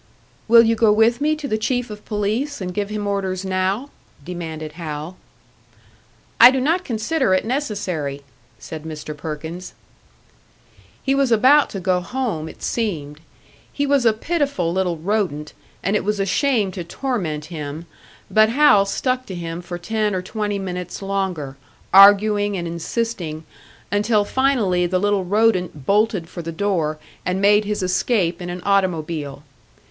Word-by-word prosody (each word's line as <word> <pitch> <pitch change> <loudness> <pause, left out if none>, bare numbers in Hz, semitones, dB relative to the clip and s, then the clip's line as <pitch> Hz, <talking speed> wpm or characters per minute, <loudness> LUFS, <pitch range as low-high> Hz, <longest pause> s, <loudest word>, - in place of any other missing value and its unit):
"Will 230 +1 +8
you 230 0 +3
go 225 -1 +4
with 225 +4 +3
me 305 +1 +2
to 300 -2 -6
the 215 -4 -1
Chief 245 +1 -1
of 210 0 -9
Police 220 +7 -2
and 180 -2 -4
give 205 0 -2
him 210 -1 -3
orders 195 -2 -2
now?" 190 +8 -1 0.3
demanded 160 -3 -6
Hal. 155 +1 -6 1.2
"I 240 - +11
do 265 +1 0
not 325 +8 +1
consider 235 - 0
it 185 - 0
necessary," 185 - -3 0.3
said 160 -1 -8
Mr. 155 -1 -7
Perkins. 160 +4 -7 1.3
He 270 - +1
was 275 -2 +2
about 260 +7 +5
to 195 - -5
go 185 -1 +1
home, 185 -8 -3
it - - -13
seemed. 155 -11 -3 0.5
He 285 - -1
was 280 -2 +2
a 230 - +5
pitiful 275 - -1
little 180 -2 0
rodent, 165 -4 -2 0.3
and 195 +3 +1
it - - +1
was 210 +1 -1
a 195 - +1
shame 215 -1 +1
to 180 -1 -6
torment 170 - -3
him; 150 +1 -6 0.5
but 215 0 +5
Hal 230 -6 +5
stuck 255 +5 -1
to 190 - -6
him 170 0 -5
for 175 0 -6
ten 210 +2 -1
or 180 - -2
twenty 205 +1 -3
minutes 180 -1 -5
longer, 185 -8 -3 0.4
arguing 205 +1 +6
and 170 -1 -3
insisting 170 -2 -3 0.5
until 210 +1 +2
finally 215 -10 +1
the 185 +1 0
little 200 0 +1
rodent 185 -7 +1
bolted 205 -3 +1
for 175 - -7
the 165 0 -5
door, 165 -4 -1 0.3
and 180 +1 -1
made 205 +1 +4
his 210 -2 -2
escape 185 -2 0
in 175 - -5
an 175 0 -6
automobile. 160 -7 -1
195 Hz, 155 wpm, -21 LUFS, 170-225 Hz, 1.3 s, I